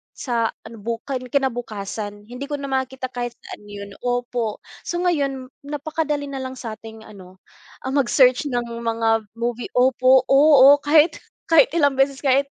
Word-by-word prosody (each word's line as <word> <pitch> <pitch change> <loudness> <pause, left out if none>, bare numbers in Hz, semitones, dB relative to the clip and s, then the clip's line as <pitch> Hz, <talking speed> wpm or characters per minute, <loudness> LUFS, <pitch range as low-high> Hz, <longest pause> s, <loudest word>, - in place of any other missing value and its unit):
sa 235 -3 -1 0.2
ano 225 0 -11
bu 230 +2 -3
kinabukasan. 235 -6 -3
Hindi 250 +5 -8
ko 295 - -3
na 275 -1 -6
makita 260 -1 -3
kahit 240 -1 -4
saan 210 - -12
yun 200 0 -9
opo, 245 -3 -2 0.2
so 345 - -2
ngayon 275 -6 -1 0.2
napakadali 300 0 -2
na 270 - -5
lang 260 0 -6
sa'ting 225 -2 -9
ano, 185 -3 -14 0.5
ang 265 +2 0
mag-search 255 +1 +3
ng 245 -3 -2
mga 225 -1 0
movie 235 +1 -4
opo, 255 +1 +4
oo, 285 0 +7
kahit 315 +3 +4 0.3
kahit 300 -5 +7
ilang 285 -5 +2
beses 275 +1 +1
kahit. 275 +1 +3
255 Hz, 150 wpm, -22 LUFS, 230-275 Hz, 0.5 s, oo